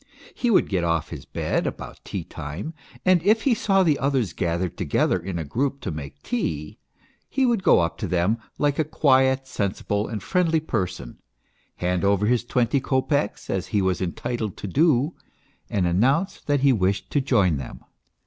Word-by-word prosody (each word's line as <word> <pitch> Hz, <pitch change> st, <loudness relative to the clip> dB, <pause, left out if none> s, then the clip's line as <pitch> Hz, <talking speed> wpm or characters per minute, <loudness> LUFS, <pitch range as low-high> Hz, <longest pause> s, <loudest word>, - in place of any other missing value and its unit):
He 245 Hz, -, -1 dB
would 215 Hz, -, +4 dB
get 95 Hz, -4 st, 0 dB
off 85 Hz, -2 st, 0 dB
his -, -, -7 dB
bed -, -, -1 dB
about -, -, -7 dB
tea -, -, -5 dB
time, 80 Hz, -, -6 dB, 0.3 s
and 185 Hz, -2 st, +5 dB
if 215 Hz, +5 st, +3 dB
he 270 Hz, -, +4 dB
saw 195 Hz, -3 st, +2 dB
the 155 Hz, -5 st, +2 dB
others 135 Hz, -9 st, 0 dB
gathered 85 Hz, 0 st, -1 dB
together 90 Hz, 0 st, +1 dB
in 90 Hz, +1 st, -5 dB
a 80 Hz, -, -2 dB
group 135 Hz, -, -1 dB
to 95 Hz, -, -3 dB
make 70 Hz, -2 st, -8 dB
tea 75 Hz, -1 st, -3 dB, 0.5 s
he 265 Hz, -1 st, +1 dB
would 235 Hz, -5 st, +2 dB
go -, -, +5 dB
up 85 Hz, 0 st, -2 dB
to -, -, -2 dB
them 90 Hz, +6 st, +1 dB, 0.2 s
like 145 Hz, 0 st, +1 dB
a -, -, +4 dB
quiet, 135 Hz, -3 st, +3 dB
sensible, 105 Hz, -2 st, -2 dB
and 105 Hz, -4 st, -5 dB
friendly 170 Hz, -3 st, +2 dB
person, 90 Hz, -, -4 dB, 0.6 s
hand 90 Hz, 0 st, -1 dB
over 100 Hz, +1 st, +3 dB
his 120 Hz, +2 st, +2 dB
twenty 125 Hz, +2 st, +1 dB
kopecks, 130 Hz, -3 st, 0 dB
as 95 Hz, -1 st, -2 dB
he 105 Hz, -, +1 dB
was 95 Hz, 0 st, 0 dB
entitled 110 Hz, +3 st, -3 dB
to -, -, -5 dB
do, 145 Hz, -, +2 dB, 0.6 s
and 95 Hz, -3 st, 0 dB
announce 135 Hz, -, +1 dB
that 145 Hz, -2 st, 0 dB
he 140 Hz, -1 st, +5 dB
wished 95 Hz, -2 st, 0 dB
to 145 Hz, -, +2 dB
join 100 Hz, -, +2 dB
them. 65 Hz, -, -8 dB
110 Hz, 180 wpm, -24 LUFS, 90-145 Hz, 0.6 s, and